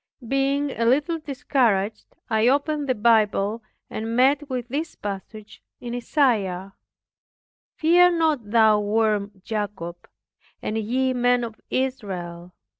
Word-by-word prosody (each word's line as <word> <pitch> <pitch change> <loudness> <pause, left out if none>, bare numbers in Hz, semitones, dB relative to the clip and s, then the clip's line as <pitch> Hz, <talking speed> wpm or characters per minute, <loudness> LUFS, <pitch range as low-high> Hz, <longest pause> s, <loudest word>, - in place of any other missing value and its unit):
Being 275 +2 0
a 230 - -2
little 290 +8 +2
discouraged, 240 -8 0 0.2
I 220 0 +2
opened 290 +1 +1
the 255 - +2
Bible, 215 -1 +2 0.3
and 225 +1 -4
met 275 +3 +3
with 250 -2 -3
this 295 +7 -4
passage 205 +1 -8 0.2
in 240 -1 -6
Isaiah, 210 - 0 1.0
"Fear 350 +2 +4
not 305 -10 0
thou 220 -1 +5
worm 210 -2 0
Jacob, 195 -6 -5 0.5
and 215 - -4
ye 255 +4 0
men 245 0 +2
of 225 -2 -7
Israel. 185 -9 -3
230 Hz, 115 wpm, -24 LUFS, 210-270 Hz, 1.0 s, thou